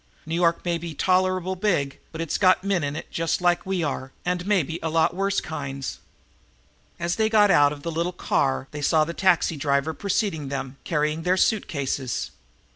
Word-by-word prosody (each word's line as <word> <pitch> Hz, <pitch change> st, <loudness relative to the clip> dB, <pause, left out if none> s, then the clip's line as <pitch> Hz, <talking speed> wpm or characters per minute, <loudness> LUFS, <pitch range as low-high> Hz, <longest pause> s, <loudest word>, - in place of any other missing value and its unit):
New 160 Hz, -, -5 dB
York 170 Hz, 0 st, +2 dB
may 170 Hz, -1 st, 0 dB
be 165 Hz, -2 st, -6 dB
tolerable 185 Hz, +1 st, +1 dB
big, 175 Hz, -8 st, 0 dB
but 160 Hz, -, -8 dB
it's 165 Hz, -, -2 dB
got 185 Hz, -1 st, +4 dB
men 195 Hz, -4 st, 0 dB
in 145 Hz, 0 st, -2 dB
it -, -, -7 dB
just 165 Hz, 0 st, 0 dB
like 175 Hz, 0 st, +1 dB
we 190 Hz, -3 st, 0 dB
are, 135 Hz, -3 st, -3 dB
and 180 Hz, +1 st, -1 dB
maybe 170 Hz, -5 st, +1 dB
a 160 Hz, -, -1 dB
lot 165 Hz, +2 st, +2 dB
worse 195 Hz, +1 st, +1 dB
kinds." 140 Hz, -4 st, -5 dB, 1.0 s
As 170 Hz, 0 st, -1 dB
they 220 Hz, -1 st, +2 dB
got 210 Hz, -2 st, +5 dB
out 145 Hz, -4 st, +5 dB
of 145 Hz, -1 st, -8 dB
the 170 Hz, -, -3 dB
little 170 Hz, +2 st, -1 dB
car 135 Hz, -6 st, 0 dB
they 150 Hz, -, -6 dB
saw 155 Hz, +2 st, +3 dB
that 170 Hz, +1 st, -6 dB
the -, -, -7 dB
taxi 180 Hz, -3 st, +3 dB
driver 140 Hz, +2 st, +1 dB
had -, -, -14 dB
preceded 190 Hz, -7 st, -1 dB
them, 135 Hz, -1 st, -5 dB
carrying 150 Hz, 0 st, 0 dB
their 180 Hz, +2 st, +1 dB
suit 215 Hz, +3 st, +2 dB
cases. 135 Hz, -5 st, -3 dB
165 Hz, 200 wpm, -24 LUFS, 145-185 Hz, 1.0 s, got